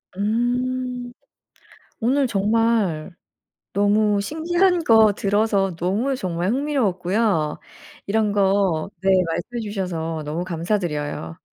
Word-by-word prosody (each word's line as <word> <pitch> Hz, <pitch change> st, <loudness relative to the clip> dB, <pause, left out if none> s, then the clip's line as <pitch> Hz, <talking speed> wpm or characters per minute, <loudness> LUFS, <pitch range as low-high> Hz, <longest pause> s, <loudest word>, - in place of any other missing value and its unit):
음 245 Hz, +3 st, -1 dB, 0.9 s
오늘 265 Hz, +4 st, +2 dB
정말 210 Hz, -5 st, +1 dB, 0.6 s
너무 205 Hz, +1 st, +2 dB
신기한 345 Hz, -, +1 dB
거 220 Hz, -2 st, +6 dB
들어서 200 Hz, -2 st, +1 dB
너무 205 Hz, +11 st, 0 dB
정말 180 Hz, -2 st, -2 dB
흥미로웠고요. 205 Hz, -, 0 dB, 0.5 s
이런 210 Hz, 0 st, +1 dB
거 195 Hz, -4 st, +1 dB
네. 195 Hz, -, +3 dB, 0.2 s
말씀해 235 Hz, +8 st, -4 dB
주셔서 170 Hz, -6 st, -3 dB
너무 160 Hz, +4 st, -3 dB
감사드려요. 165 Hz, -, -3 dB
205 Hz, 215 characters per minute, -22 LUFS, 180-235 Hz, 0.9 s, 거